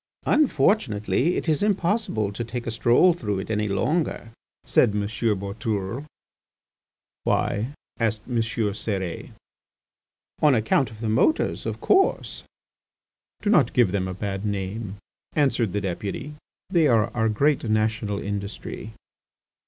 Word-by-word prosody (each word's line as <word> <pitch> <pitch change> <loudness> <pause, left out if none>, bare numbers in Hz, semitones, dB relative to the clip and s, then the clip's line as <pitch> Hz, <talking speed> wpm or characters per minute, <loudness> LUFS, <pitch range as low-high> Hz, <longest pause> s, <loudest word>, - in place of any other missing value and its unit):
"Unfortunately, 140 - +2
it - - -3
is 155 -2 +2
impossible 200 - 0
to 110 +4 -4
take 120 +1 -5
a 115 - -2
stroll 120 +10 +4
through 105 - -3
it 95 - -4
any 105 0 0
longer," 115 - -1 0.3
said 105 - +3
M. 105 - +1
Boutourlé. 105 +3 -2 1.2
"Why?" 105 +5 0 0.3
asked 110 -2 0
M. 125 -2 -1
Cérès. 105 -5 -2 1.1
"On 150 -3 +5
account 110 +3 +2
of 110 0 -13
the 115 - -2
motors, 125 - +1
of - - -3
course." 390 0 +2 1.0
"Do 205 - +2
not 155 -10 +4
give 120 -7 +4
them 95 -1 -1
a 95 - -5
bad 95 0 -4
name," 100 0 -3 0.4
answered 130 -8 +2
the 105 - -1
Deputy. 100 +9 -4 0.4
"They 170 -5 +4
are 115 -1 +2
our 110 -1 +2
great 140 +7 +2
national 110 -1 0
industry." 100 +2 -5
110 Hz, 130 wpm, -24 LUFS, 100-135 Hz, 1.2 s, On